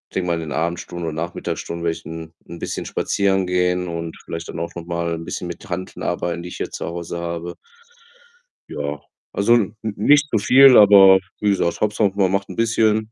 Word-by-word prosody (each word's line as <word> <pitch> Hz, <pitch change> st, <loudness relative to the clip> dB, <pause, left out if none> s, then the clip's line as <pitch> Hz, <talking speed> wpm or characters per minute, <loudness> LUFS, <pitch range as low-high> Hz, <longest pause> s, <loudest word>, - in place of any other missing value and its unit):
denke 90 Hz, -1 st, -1 dB
mal, 85 Hz, -, +1 dB
in 85 Hz, -, -4 dB
den 80 Hz, -, -6 dB
Abendstunden 85 Hz, +1 st, -3 dB
und 75 Hz, -, -4 dB
Nachmittagsstunden 85 Hz, 0 st, -4 dB
werde 80 Hz, -1 st, 0 dB
ich -, -, -16 dB
'n 80 Hz, 0 st, -8 dB
'n 85 Hz, 0 st, -9 dB
bisschen -, -, -4 dB
spazieren 95 Hz, -2 st, 0 dB
gehen 90 Hz, 0 st, 0 dB
und 85 Hz, -1 st, -5 dB
vielleicht 85 Hz, 0 st, -6 dB
dann -, -, -6 dB
auch 85 Hz, -, -5 dB
noch 85 Hz, -1 st, -7 dB
mal 85 Hz, -1 st, -2 dB
'n 80 Hz, -, -7 dB
bisschen 90 Hz, -, -5 dB
mit 85 Hz, +2 st, -9 dB
Hanteln 90 Hz, +1 st, -5 dB
arbeiten, 85 Hz, 0 st, -2 dB
die 90 Hz, -, -7 dB
ich -, -, -8 dB
hier -, -, -4 dB
zu -, -, -5 dB
Hause 85 Hz, 0 st, -5 dB
habe. 85 Hz, 0 st, -5 dB, 1.1 s
Ja, 75 Hz, 0 st, -4 dB, 0.3 s
also 100 Hz, +4 st, +2 dB
n 110 Hz, -2 st, 0 dB
n 110 Hz, -2 st, -3 dB
nicht 145 Hz, +8 st, +4 dB
zu 115 Hz, -, +1 dB
viel, 130 Hz, +4 st, +7 dB
aber 100 Hz, -2 st, +8 dB, 0.2 s
wie 105 Hz, -, +1 dB
gesagt, 85 Hz, -3 st, 0 dB
Hauptsache 105 Hz, -1 st, +1 dB
man 95 Hz, -2 st, +2 dB
macht 100 Hz, 0 st, -1 dB
'n -, -, -7 dB
bisschen. 110 Hz, -1 st, +1 dB
90 Hz, 210 wpm, -21 LUFS, 85-100 Hz, 1.1 s, aber